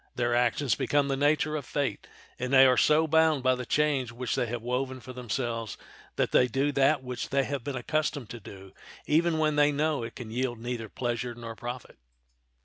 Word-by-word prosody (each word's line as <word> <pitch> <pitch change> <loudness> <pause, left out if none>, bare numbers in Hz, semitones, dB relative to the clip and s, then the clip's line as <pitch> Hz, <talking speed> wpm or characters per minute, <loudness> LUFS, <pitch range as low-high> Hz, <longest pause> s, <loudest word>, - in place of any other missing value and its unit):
Their 120 -1 0
actions 120 +1 +2
become 140 +3 +1
of - - -4
the 135 +1 +1
nature 155 +1 +1
of 150 - -3
fate, 135 -4 -3 0.3
and 125 +1 -3
they 135 -1 +8
are 130 -1 +5
so 155 +5 +4
bound 160 -3 +3
by 130 0 +4
the 125 -1 -5
chains 145 -5 +1
which 120 0 -3
they 120 - 0
have 115 0 -4
woven 130 +2 -2
for 130 +1 -10
themselves 120 -2 -3 0.4
that - - 0
they 125 - +4
do 135 +4 0
that 140 0 +2
which 125 -1 -5
they 135 0 +2
have 140 -2 -4
been 140 +1 -4
accustomed 145 -1 -2
to 120 - -7
do 95 -1 -12 0.3
even 160 +2 +2
when 155 -1 +1
they 145 0 +5
know 150 0 0
it 115 0 -6
can 115 -4 -8
yield 120 0 -2
neither 115 -1 -5
pleasure 120 0 -3
nor 115 -1 -8
profit. 120 - -8
130 Hz, 210 wpm, -28 LUFS, 120-145 Hz, 0.4 s, they